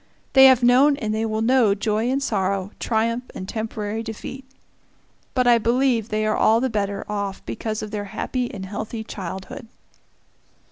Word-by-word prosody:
They 265 0 +8
have 255 -2 +5
known 265 +4 +5
and 215 -4 -2
they 220 +1 -1
will 220 0 -1
know 235 -4 +4
joy 215 +3 0
and 275 +2 0
sorrow, 195 -4 -1
triumph 230 +2 0
and 185 - -6
temporary 220 0 -4
defeat. 230 +4 -7 0.9
But 255 -1 +2
I 240 -1 +5
believe 235 -1 +1
they 215 0 0
are 215 - +1
all 225 +1 +4
the 260 0 -1
better 200 -2 -2
off 200 -2 -4
because 215 -1 -4
of 210 - -7
their 205 -1 -3
happy 245 +4 -3
and 190 -2 -7
healthy 215 +3 -5
childhood. 190 +4 -7
220 Hz, 170 wpm, -23 LUFS, 210-245 Hz, 0.9 s, They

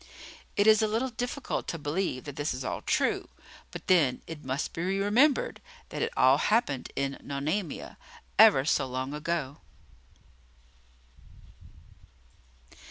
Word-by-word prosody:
It 205 - +4
is 215 0 +6
a 220 - +2
little 230 +5 -1
difficult 245 +4 -4
to 165 - -3
believe 145 -3 -2
that 145 -2 -8
this 145 -2 -2
is 130 - -6
all - - -3
true; - - 0 0.4
but - - -9
then, 150 -9 +3
it 160 -2 -9
must 130 +2 -3
be 165 - -4
remembered 205 - +2 0.3
that - - -5
it 460 0 0
all - - +5
happened 210 - 0
in 140 0 -2
Nonamia, 150 +5 -3 0.4
ever 210 -12 +7
so 140 -3 +1
long 130 +2 -4
ago! 150 -2 -3
165 Hz, 130 wpm, -28 LUFS, 140-215 Hz, 0.4 s, ever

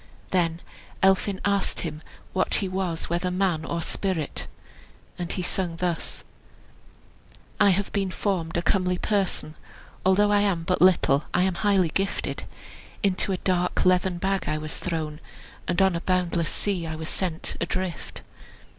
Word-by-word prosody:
Then 170 -2 +1 0.4
Elphin 190 0 +3
asked 200 -1 +1
him 155 -2 -4 0.3
what 190 - +2
he 195 - +1
was, 185 -3 -2
whether 175 +2 0
man 180 -3 +1
or 170 +1 -2
spirit. 180 -7 -1 0.7
And 175 -1 -3
he 185 - -2
sung 175 -2 -1
thus: 170 -1 -2 1.4
"I 200 - +6
have 195 +1 +1
been 195 -2 0
formed 180 -4 -1
a 170 - 0
comely 180 +1 +2
person; 195 -6 0 0.5
Although 205 +2 +4
I 205 0 +4
am 190 -5 +1
but 180 +2 0
little, 160 -6 +4
I 180 - +4
am 190 0 +2
highly 190 -1 +2
gifted; 195 +5 -2 0.6
Into 195 0 +2
a 185 - 0
dark 180 0 +1
leathern 180 0 +3
bag 195 +2 0
I 155 - 0
was 155 0 -4
thrown, 155 -3 -3 0.5
And 175 - +1
on 190 -2 +3
a 170 - -2
boundless 175 -3 +1
sea 185 -5 -1
I 160 - -4
was 160 0 -5
sent 170 -2 -2
adrift. 175 -1 -3
180 Hz, 155 wpm, -26 LUFS, 170-190 Hz, 1.4 s, I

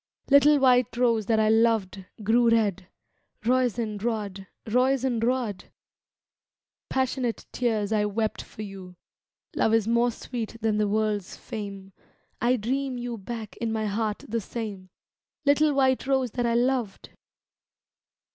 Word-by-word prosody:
Little 285 +1 +7
white 255 -3 +3
rose 230 -4 +2
that 225 -1 +3
I 215 0 +3
loved 220 -4 +2 0.2
grew 230 +3 +4
red, 210 -6 +1 0.6
Roisin 235 -4 0
mad, 205 -5 -3 0.2
Roisin 250 0 +1
mad! 240 -5 -1 1.2
Passionate 260 -2 -1
tears 220 -4 0
I 210 -1 +2
wept 215 +1 -1
for 215 - -9
you. 190 -3 -9 0.6
Love 225 - +3
is 225 -2 +1
more 235 +1 +3
sweet 230 -1 -6
than 220 -2 0
the 210 - +2
world's 210 -2 -1
fame, 195 -3 -7 0.5
I 240 +2 +3
dream 255 +3 -2
you 240 -1 -4
back 220 +1 -7
in 230 -1 -2
my 220 -1 -1
heart 210 0 -2
the 230 +1 -2
same. 200 -4 -6 0.6
Little 295 +2 +4
white 265 -2 +2
rose 265 -3 +1
that 245 0 -1
I 235 - +1
loved 245 -4 -1
230 Hz, 135 wpm, -26 LUFS, 210-250 Hz, 1.2 s, Little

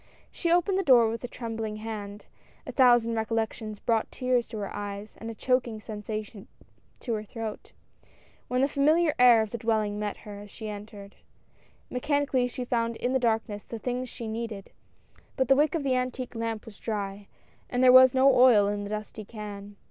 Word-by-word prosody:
She 340 - -2
opened 355 +3 +3
the - - 0
door 245 -7 +6
with 230 - -6
a - - -3
trembling 225 -3 -5
hand. 210 -2 -7 0.4
A - - -6
thousand 240 -3 +4
recollections 220 -1 -2
brought 225 +1 0
the - - -17
tears 250 -2 +1
to 225 - -7
her 200 -2 -5
eyes 205 0 -6
and 225 - -5
a 225 - -7
choking 245 -2 0
sensation 215 -1 -6 0.5
to 240 - -3
her 215 -1 -2
throat, 220 0 -7 0.8
when 250 +1 0
the 275 - +4
fami 300 +4 +3
liar 310 -3 +2
air 240 -3 +7
of 215 - -7
the 235 - -4
dwelling 215 -2 0
met 210 -1 -3
her 205 -1 -8
as 205 0 -11
she 220 +1 -8
entered. 205 -1 -9 0.7
Mechanically 275 -1 +1
she 250 +1 -5
found 230 -1 -1
in 245 +3 -2
the 265 - +3
darkness 220 -3 -1
the 230 - -7
things 250 +2 -3
she 230 - -7
needed, 220 -3 -5 0.7
but 260 -2 +1
the 270 - +7
wick 300 +3 +2
of 315 - -1
the 270 -2 +1
antique 255 0 -2
lamp 225 -2 -4
was 220 -3 -13
dry, 200 -2 -4 0.4
and 250 +1 0
there 250 -1 +8
was 260 0 +8
no 270 +1 +6
oil 240 -5 +6
in 205 0 -2
the 200 - -6
dusty 215 0 -5
can. 205 -1 -9
225 Hz, 195 wpm, -27 LUFS, 210-250 Hz, 0.8 s, there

